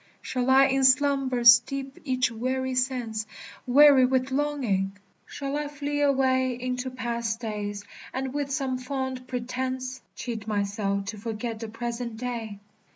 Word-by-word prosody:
Shall 250 0 -2
I 270 +1 +7
in 270 0 +1
slumber 265 -2 +3
steep 265 +4 +5
each 255 -3 +1
weary 260 +3 -2
sense, 245 -4 -1 0.4
Weary 275 +1 +7
with 260 +1 +1
longing? 250 -9 0 0.3
shall 275 0 -4
I 295 0 -2
flee 290 0 -3
away 260 -3 +2
Into 250 +1 -3
past 235 -3 -3
days, 205 -3 -4 0.3
and 260 0 -3
with 285 -1 -2
some 270 -2 -1
fond 260 -1 -4
pretence 255 +1 -3
Cheat 225 -4 -5
myself 200 -1 -1
to 210 +1 -6
forget 225 +1 -4
the 225 - -5
present 235 +1 -5
day? 230 -4 -4
255 Hz, 140 wpm, -26 LUFS, 230-265 Hz, 0.4 s, I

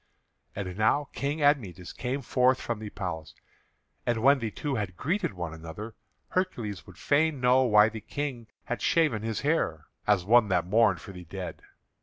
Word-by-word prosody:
And 95 -1 -5
now 135 +6 +2
King 145 +2 -2
Admetus 105 - +1
came 130 +2 -3
forth 130 +2 +3
from 120 -2 -3
the 110 -1 -6
palace. 85 -6 -5 0.7
And 120 -2 0
when 140 +1 +6
the 115 -2 -2
two 140 +7 -4
had 100 -7 -3
greeted 175 - -1
one 85 -3 -4
another, 80 +8 -8 0.4
Hercules 120 - -2
would 90 - -13
fain 150 0 +2
know 125 +1 +4
why 105 -2 +6
the 110 0 -6
King 130 -2 -4 0.2
had 120 - -4
shaven 155 -10 +2
his 110 0 -3
hair 140 - 0 0.2
as 100 -4 +3
one 115 +1 +5
that 90 -3 +1
mourned 110 +5 +3
for 100 - -9
the 90 -2 -10
dead. 90 0 -7
110 Hz, 175 wpm, -28 LUFS, 95-135 Hz, 0.7 s, when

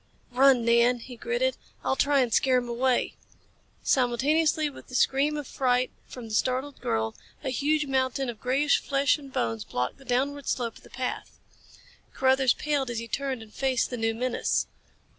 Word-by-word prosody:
"Run, 255 -1 +5
Nan," 235 +1 +4
he 245 +1 -10
gritted. 485 - -1 0.3
"I'll - - +1
try 280 0 +3
and 240 -3 0
scare 260 -2 +4
him 245 -1 -1
away." 245 +1 +1 0.7
Simultaneously 300 +5 +2
with 285 - -10
the 255 - -8
scream 280 +4 +2
of 295 - -4
fright 250 -1 +1 0.2
from 245 -3 -9
the 220 - -8
startled 260 +5 -1
girl, 110 0 -1 0.3
a 265 - -2
huge 300 +4 +1
mountain 265 0 0
of 235 -3 -6
grayish 270 +4 +2
flesh 280 +2 +2
and 275 -2 -12
bones 115 - -1
blocked 125 - -3
the - - -15
downward 275 +3 -1
slope 235 -3 -2
of - - -17
the - - -17
path. 255 0 -5 0.8
Carruthers 265 -1 +3
paled 290 -3 -1
as 235 - -3
he 230 +1 -4
turned 260 0 -3
and 215 - -17
faced 260 -2 0
the - - -2
new 225 0 0
menace. 250 +1 0
260 Hz, 180 wpm, -27 LUFS, 240-275 Hz, 0.8 s, Run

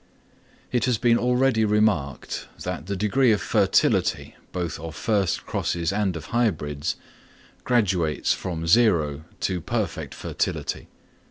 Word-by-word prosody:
It 120 - +1
has 125 -3 +2
been 120 +1 +3
already 125 -1 +2
remarked, 105 -10 0 0.2
that 75 - -4
the 100 - -2
degree 115 +6 +3
of 105 - +2
fertility, - - +2 0.2
both 90 -2 -3
of 80 -1 -7
first 100 -4 0
crosses 85 +1 -1
and 100 -3 0
of 80 - -8
hybrids, 80 -10 0 0.7
graduates 90 - +2
from 85 -3 -4
zero 80 -7 +3 0.2
to 90 -2 -1
perfect - - -3
fertility. - - -3
95 Hz, 120 wpm, -24 LUFS, 80-115 Hz, 0.7 s, been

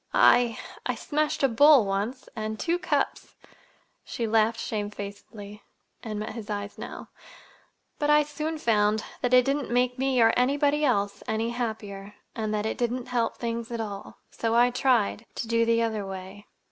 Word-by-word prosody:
I—I 240 -2 +2
smashed 305 0 -1
a - - +6
bowl 275 0 +6
once, 205 +7 -3
and 215 -1 -4
two 345 +1 0
cups." - - -2 0.7
She 235 - -4
laughed 225 +1 +2
shamefacedly, 205 0 -6 0.4
and 215 -2 -5
met 215 - -5
his 220 -2 -8
eyes 205 -1 -5
now. - - -8 0.9
"But 295 - 0
I 300 0 +6
soon 305 +2 -4
found—that 220 0 0
it 250 -1 +6
didn't 280 0 -1
make 250 +1 +1
me 265 -1 +1
or 225 -1 +5
anybody 285 +4 +2
else—any 220 -1 0
happier, 210 -4 -5 0.2
and 215 -1 -2
that 210 0 -1
it 220 - -3
didn't 245 +1 -2
help 235 -2 0
things 235 -1 -3
at 235 -1 -4
all. 205 -3 -6
So 230 0 -1
I 245 +1 +5
tried—to 235 -3 0
do 230 0 +2
the 230 0 +2
other 220 -2 -1
way. 195 +1 -8
230 Hz, 155 wpm, -26 LUFS, 210-250 Hz, 0.9 s, a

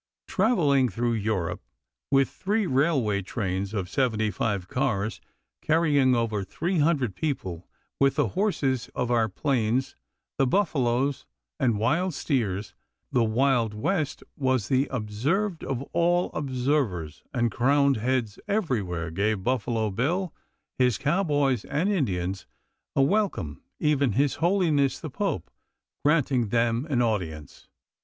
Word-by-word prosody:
Traveling 150 - +3
through 120 +4 -1
Europe 105 -6 -1 0.5
with 135 -1 +4
three 210 +2 -1
railway 130 - +1
trains 95 -1 -3
of 100 -5 -2
seventy 110 -1 0
five 100 -5 -2
cars, 110 -5 -1 0.4
carrying 145 -5 +3
over 110 -4 0
three 170 - -2
hundred 145 - +1
people, 95 - -3 0.3
with 135 0 +3
the - - +1
horses 145 - 0
of 125 -1 -1
our 115 -2 +2
plains, 125 +1 0 0.4
the 135 - +4
buffaloes, 135 -6 +1 0.3
and 120 -6 +2
wild 160 - +1
steers, 105 - -1 0.4
the 120 - +3
Wild 115 -1 +2
West 155 - -1
was 130 -6 0
the 135 +1 +2
observed 140 - -1
of 135 -1 -3
all 175 +1 +2
observers, 130 - -1
and 120 -2 0
crowned 140 +2 +3
heads 120 -2 -1
everywhere 105 - -1
gave 100 +3 0
Buffalo 115 -3 0
Bill, 160 - -1 0.5
his 125 -5 +3
cowboys, 145 - +1
and 165 +8 0
Indians 95 - -1 0.5
a 135 - +4
welcome, 175 - 0 0.2
even 140 -6 +2
his 140 +4 +2
holiness 165 -6 +2
the 155 - -7
pope 195 - -2 0.5
granting 140 -6 +2
them 115 +4 +1
an 125 -4 +2
audience. 80 - -3
130 Hz, 125 wpm, -26 LUFS, 110-150 Hz, 0.5 s, with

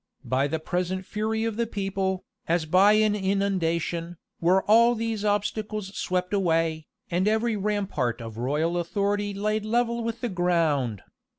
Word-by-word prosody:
By 130 +3 +1
the 160 - -1
present 180 +3 -2
fury 220 +2 -2
of 225 -1 -2
the 235 -1 0
people, 195 -2 -2 0.2
as 165 -1 +1
by 190 +6 +5
an 215 0 +3
inundation, 175 -4 -1 0.2
were 185 +3 +3
all 235 +3 +5
these 225 -2 -2
obstacles 210 -1 -2
swept 180 +1 -1
away, 165 -5 +1 0.2
and 180 +3 +1
every 220 +1 +1
rampart 195 - -1
of 115 -1 -8
royal 155 +7 0
authority 205 +3 -1
laid 210 +2 -1
level 235 +1 0
with 230 0 -4
the 245 - -1
ground. 165 - +1
195 Hz, 150 wpm, -26 LUFS, 170-215 Hz, 0.2 s, by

